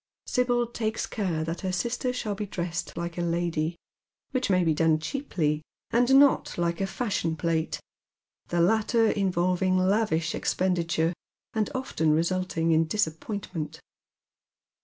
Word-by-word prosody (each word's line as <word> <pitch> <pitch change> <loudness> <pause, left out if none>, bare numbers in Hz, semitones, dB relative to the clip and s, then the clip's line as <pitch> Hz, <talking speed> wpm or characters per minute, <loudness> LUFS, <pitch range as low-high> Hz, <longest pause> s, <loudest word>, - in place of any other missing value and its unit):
Sibyl 245 -1 +1
takes 225 -2 -2
care 180 -8 -2
that 165 +2 -4
her 190 - -1
sister 240 +6 -1
shall 235 -4 -2
be 205 +1 -4
dressed 175 -2 -4
like 170 0 -4
a - - +1
lady, 170 -1 0 0.6
which 255 -3 0
may 185 -2 +4
be 165 -2 +3
done 160 0 +3
cheaply, 155 - -1 0.3
and 245 +3 +4
not 280 -1 +4
like 170 +1 0
a - - +2
fasliion 190 -6 -1
plate, 160 0 -1 0.7
the 175 - -1
latter 220 +4 +3
involving 185 -1 +1
lavish 185 -3 +2
expenditure, 170 -2 0 0.4
and 215 -1 0
often 160 -12 +1
resulting 170 0 +1
in 160 0 +4
dis 210 +7 +2
appointment. 165 0 -5
180 Hz, 140 wpm, -27 LUFS, 165-215 Hz, 0.7 s, may